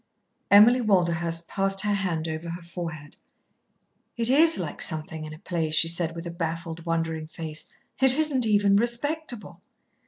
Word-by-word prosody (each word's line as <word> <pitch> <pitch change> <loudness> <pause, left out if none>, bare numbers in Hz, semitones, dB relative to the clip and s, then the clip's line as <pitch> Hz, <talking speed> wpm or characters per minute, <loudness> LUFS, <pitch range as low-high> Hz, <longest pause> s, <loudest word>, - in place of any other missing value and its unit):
Emily 225 +5 +7
Walderhurst 170 -5 0
passed 195 -1 0
her 210 -1 0
hand 175 -5 -1
over 160 +1 -5
her 170 +1 -6
forehead. 165 -4 -7 1.0
"It 235 +1 +1
is 320 +4 +6
like 170 -5 -4
something 155 0 -2
in 155 - -8
a - - -13
play," 165 -1 -2
she 155 +2 +2
said, 165 -1 -1
with 165 +1 -7
a 170 - -5
baffled, 165 0 -5
wondering 165 -1 -2
face. 155 -1 -7 0.3
"It 265 0 +5
isn't 285 -6 +1
even 205 -1 +4
respectable." 240 +2 -1
170 Hz, 155 wpm, -26 LUFS, 165-210 Hz, 1.0 s, Emily